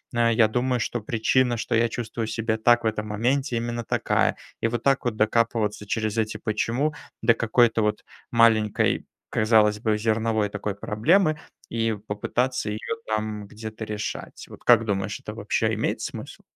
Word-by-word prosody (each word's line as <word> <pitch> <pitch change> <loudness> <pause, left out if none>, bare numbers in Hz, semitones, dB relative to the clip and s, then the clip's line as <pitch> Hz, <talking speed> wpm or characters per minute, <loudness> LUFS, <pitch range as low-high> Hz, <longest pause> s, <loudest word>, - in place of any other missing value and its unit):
э, 115 0 +3
я 110 -1 +5
думаю, 125 +3 0
что 120 +1 -2
причина, 120 +3 +1
что 115 - -1
я 115 +1 +3
чувствую 115 -1 -4
себя 110 0 -1
так 120 +2 +4
в 110 - +1
этом 105 -1 -2
моменте, 125 +5 0
именно 120 0 -3
такая?" - - +1 0.3
И - - +2
вот 120 0 -3
так 135 0 +2
вот 120 -3 0
докапываться 110 -1 +1
через 110 +1 -2
эти 110 -1 -1
"почему" 120 +7 -1 0.3
до 115 +1 +5
какой-то, 115 0 +3
вот, 105 0 -1 0.3
маленькой, 115 -3 +3 0.2
казалось, 110 -1 +3
бы 110 -1 +1
зерновой, 110 -1 0
такой, 105 -1 -4
проблемы, 155 - +2 0.3
и 115 -1 0
попытаться 125 +4 -1
ее 105 +1 -3 0.3
там 110 -1 -2
где-то 110 +1 -7
решать, 105 0 -5
вот - - -13
как 120 -2 +6
думаешь 100 -2 -2
это - - -7
вообще - - 0
имеет - - -1
смысл? - - -7
110 Hz, 165 wpm, -25 LUFS, 105-120 Hz, 0.3 s, как